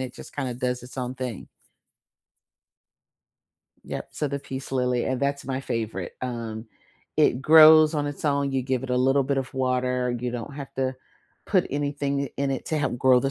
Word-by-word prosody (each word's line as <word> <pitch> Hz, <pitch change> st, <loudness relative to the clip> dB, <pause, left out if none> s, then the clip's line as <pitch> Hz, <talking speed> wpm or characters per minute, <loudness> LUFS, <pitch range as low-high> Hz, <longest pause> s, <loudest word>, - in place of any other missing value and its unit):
it 130 Hz, -1 st, -5 dB
just -, -, -11 dB
kinda 130 Hz, -4 st, -3 dB
does 125 Hz, 0 st, -2 dB
its 125 Hz, +2 st, -12 dB
own 125 Hz, 0 st, -3 dB
thing. 125 Hz, -6 st, -5 dB, 2.4 s
Yep, -, -, -5 dB
so 150 Hz, -, -2 dB
the 140 Hz, 0 st, -3 dB
peace 135 Hz, 0 st, -7 dB
lily, 125 Hz, -2 st, +1 dB
and 130 Hz, 0 st, -1 dB
that's 140 Hz, 0 st, -1 dB
my 130 Hz, 0 st, -2 dB
favorite, 110 Hz, -8 st, -4 dB
um, 115 Hz, -3 st, -5 dB, 0.5 s
it 125 Hz, -, +3 dB
grows 155 Hz, +1 st, +8 dB
on 145 Hz, -1 st, 0 dB
its 145 Hz, +1 st, -6 dB
own, 140 Hz, -1 st, +1 dB
you 130 Hz, -1 st, 0 dB
give 130 Hz, 0 st, -1 dB
it 130 Hz, -, -5 dB
a 125 Hz, -, +2 dB
little 135 Hz, +2 st, +3 dB
bit 135 Hz, +1 st, 0 dB
of 135 Hz, -, -4 dB
water, 125 Hz, -1 st, 0 dB
you 125 Hz, -, -2 dB
don't 120 Hz, +3 st, -6 dB
have 140 Hz, -2 st, -8 dB
to 130 Hz, 0 st, -1 dB, 0.5 s
put -, -, +2 dB
anything 140 Hz, 0 st, -1 dB
i 130 Hz, -, -7 dB
in 140 Hz, -1 st, 0 dB
it 135 Hz, -, -3 dB
to 155 Hz, -, 0 dB
help 130 Hz, -4 st, -1 dB
grow 130 Hz, -1 st, +5 dB
the 135 Hz, -, 0 dB
130 Hz, 195 wpm, -25 LUFS, 125-140 Hz, 2.4 s, grows